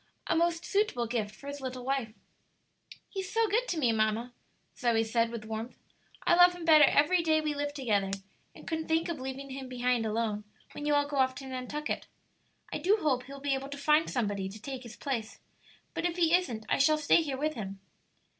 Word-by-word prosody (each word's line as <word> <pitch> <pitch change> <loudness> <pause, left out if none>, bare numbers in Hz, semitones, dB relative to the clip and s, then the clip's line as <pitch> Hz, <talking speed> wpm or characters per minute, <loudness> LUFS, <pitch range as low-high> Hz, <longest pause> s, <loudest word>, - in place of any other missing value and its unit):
"A - - +1
most 335 +1 +1
suitable 395 - +1
gift 220 -3 -2
for 275 - -15
his 285 0 -6
little 255 -1 -5
wife." 265 -4 -1 1.0
"He's 385 -2 -5
so 455 0 +2
good 460 +5 +1
to 345 - -2
me, 250 -7 +3
mamma," 220 +2 0 0.4
Zoe 235 -3 +2
said, 230 +1 +1
with 230 -2 -6
warmth. 220 +2 -5 0.5
"I - - +5
love 355 +1 +7
him 345 -2 -7
better 310 -2 +8
every 300 +6 +4
day 315 -1 +3
we 305 -1 -1
live 290 0 -2
together, 215 -9 0 0.5
and - - -13
couldn't 320 -1 -2
think 325 +1 +1
of 330 -4 -3
leaving 265 +1 -6
him 265 -1 -6
behind 245 -2 0
alone, 215 -1 -1 0.3
when 295 - -5
you 295 - +3
all 290 0 +2
go 290 -1 -4
off 260 -1 +3
to 270 - -8
Nantucket. 265 +3 -4 0.7
I - - -2
do 405 +4 +3
hope 260 -8 +1
he'll 275 +1 -9
be 280 0 0
able 270 +1 -3
to 285 - -6
find 300 +3 +3
somebody 205 -6 -1
to 210 +3 -10
take 265 +2 -6
his 235 -2 -10
place; 235 -6 -4 0.5
but - - -3
if 340 - -4
he 335 -2 +3
isn't 245 -12 +1
I - - +1
shall 305 +3 +5
stay 305 +2 +4
here 280 -4 -3
with 305 +3 0
him." 195 -5 -6
275 Hz, 210 wpm, -30 LUFS, 235-310 Hz, 1.0 s, better